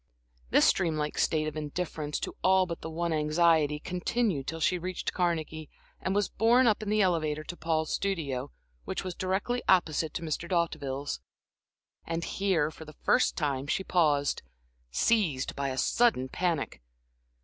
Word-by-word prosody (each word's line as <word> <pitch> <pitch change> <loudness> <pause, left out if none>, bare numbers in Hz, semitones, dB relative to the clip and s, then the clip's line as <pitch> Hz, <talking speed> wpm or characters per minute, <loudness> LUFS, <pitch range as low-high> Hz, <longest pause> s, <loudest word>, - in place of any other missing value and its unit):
This - - +5
dream 165 -4 -1
like 150 0 -2
state 155 -1 +2
of 155 - -4
indifference 150 0 -3
to - - -4
all 190 0 +5
but 170 -2 -6
the 160 - -5
one 170 +1 -1
anxiety 155 -1 +3
continued 180 - -1
till 165 - -3
she 180 +2 +2
reached 185 +1 -3
Carnegie 160 -3 -1 0.3
and 190 - -1
was 205 -2 +2
borne 240 +3 +4
up 220 -3 +3
in 215 - -4
the 210 -1 +3
elevator 155 -4 0
to 175 - -7
Paul's 160 -2 -1
studio, 145 -9 -2 0.3
which - - -4
was 185 -1 -4
directly 190 +8 -1
opposite 160 -4 +2
to 170 - -3
Mr. 165 +2 -3
D'Hauteville's. 145 -5 -1 0.8
And 165 0 -3
here, 175 -7 0
for 160 - -11
the 155 -1 -12
first 255 - +3
time, 140 -4 -1
she 190 - 0
paused, 150 -6 +2 0.5
seized 160 - +1
by 140 -1 -1
a 130 - -4
sudden 180 - +2
panic. 170 - -1
165 Hz, 160 wpm, -29 LUFS, 150-185 Hz, 0.8 s, This